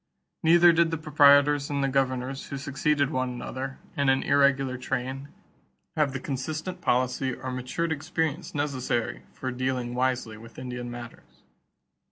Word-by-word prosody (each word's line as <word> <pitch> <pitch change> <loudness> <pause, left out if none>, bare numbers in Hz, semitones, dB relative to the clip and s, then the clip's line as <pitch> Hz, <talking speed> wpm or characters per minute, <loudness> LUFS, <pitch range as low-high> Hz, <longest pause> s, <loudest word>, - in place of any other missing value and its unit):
Neither 170 +1 +6
did 165 0 +3
the 165 - -2
proprietors 145 -1 +5
and 140 -1 -1
the - - +2
governors 130 0 -1
who 140 - -5
succeeded 140 +1 0
one 130 -3 -1
another, 130 +2 -5 0.2
in 140 -1 +2
an 135 0 +3
irregular 140 -2 +3
train, 130 +2 -3 0.7
have 150 -3 +2
the 135 - -4
consistent 155 +8 -4
policy 125 -1 +1
or 130 - -6
the 125 - -4
matured 160 +7 -2
experience 160 +1 -2
necessary 125 - -1
for 130 - -5
dealing 125 -1 -2
wisely 125 -3 -1
with 115 +1 -14
Indian 125 -1 -5
matters. 120 -1 -11
135 Hz, 150 wpm, -27 LUFS, 125-145 Hz, 0.7 s, Neither